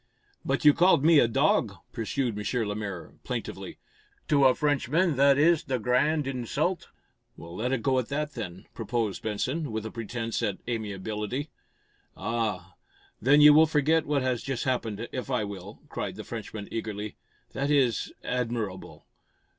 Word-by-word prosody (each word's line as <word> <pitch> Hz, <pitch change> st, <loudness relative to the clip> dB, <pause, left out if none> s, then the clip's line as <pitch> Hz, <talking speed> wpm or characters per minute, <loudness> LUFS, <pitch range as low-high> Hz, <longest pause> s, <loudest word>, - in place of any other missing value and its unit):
"But -, -, -1 dB
you 150 Hz, -, +9 dB
called 175 Hz, -4 st, +4 dB
me 165 Hz, -2 st, +7 dB
a 120 Hz, -, +5 dB
'dog,'" 115 Hz, -, +2 dB, 0.2 s
pursued 115 Hz, +1 st, -2 dB
M. 110 Hz, +2 st, -1 dB
Lemaire, 105 Hz, -4 st, -5 dB
plaintively. -, -, -5 dB, 0.5 s
"To 140 Hz, -2 st, +5 dB
a 130 Hz, -, +6 dB
Frenchman 150 Hz, +3 st, +1 dB
that 140 Hz, 0 st, +5 dB
is 160 Hz, +2 st, +4 dB
the 130 Hz, -3 st, -1 dB
gr 125 Hz, +1 st, -3 dB
r -, -, +5 dB
r -, -, +5 dB
rand 155 Hz, -1 st, 0 dB
insult!" 135 Hz, +7 st, -2 dB, 0.5 s
"Let 90 Hz, +9 st, -4 dB
it 135 Hz, -4 st, -1 dB
go 130 Hz, -2 st, +3 dB
at 120 Hz, -, -3 dB
that, 150 Hz, +1 st, -2 dB
then," 95 Hz, -6 st, -7 dB
proposed 115 Hz, -3 st, -2 dB
Benson, 130 Hz, +7 st, -2 dB
with 110 Hz, 0 st, -3 dB
a 110 Hz, -, -5 dB
pretense 115 Hz, 0 st, -3 dB
at 105 Hz, -4 st, -1 dB
amiability. 110 Hz, +4 st, -3 dB, 0.7 s
"Ah! 105 Hz, -5 st, -2 dB, 0.5 s
Then 145 Hz, +5 st, +5 dB
you 150 Hz, 0 st, +9 dB
will 160 Hz, +2 st, +7 dB
forget 155 Hz, +1 st, +2 dB
what 145 Hz, -2 st, +1 dB
has 125 Hz, -2 st, 0 dB
just 135 Hz, -3 st, -3 dB
happened, 115 Hz, -4 st, -2 dB
if 130 Hz, +1 st, -5 dB
I 125 Hz, -5 st, +1 dB
will?" 100 Hz, -1 st, -8 dB
cried -, -, -4 dB
the -, -, -7 dB
Frenchman, 105 Hz, -2 st, -7 dB
eagerly. 105 Hz, -2 st, -4 dB, 0.4 s
"That 140 Hz, +1 st, -2 dB
is 135 Hz, -6 st, +2 dB
admir 120 Hz, -2 st, -1 dB
r 100 Hz, -, -4 dB
r 95 Hz, -, -9 dB
rable! -, -, -13 dB
125 Hz, 170 wpm, -27 LUFS, 110-145 Hz, 0.7 s, you